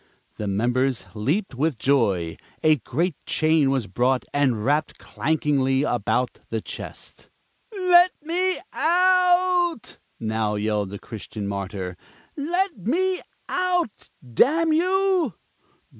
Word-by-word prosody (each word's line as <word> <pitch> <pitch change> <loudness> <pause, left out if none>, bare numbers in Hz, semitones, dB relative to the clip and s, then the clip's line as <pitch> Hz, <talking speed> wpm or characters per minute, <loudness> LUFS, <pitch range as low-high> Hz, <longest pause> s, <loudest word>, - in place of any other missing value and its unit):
The 105 - -3
members 120 +5 0
leaped 140 - -1
with 145 +1 0
joy. 100 -11 +1 0.3
A 155 -1 +5
great 155 - -1
chain 155 -3 +2
was 135 -4 0
brought 125 +7 0
and 130 -7 +1
wrapped 145 +2 0
clankingly 140 -3 0
about 120 -2 0
the 115 - -1
chest. - - -9 0.4
"Let 365 -3 +5
me 360 +4 0
out," 360 - +2 0.2
now 110 -1 -1
yelled 105 -1 -1
the 100 - -6
Christian 105 -1 -7
Martyr. 95 -2 -4 0.4
"Let 350 +4 -1
me 365 - 0 0.3
out, 360 - -1 0.2
damn 315 - +3
you!" 365 - +2
145 Hz, 110 wpm, -24 LUFS, -, 0.4 s, A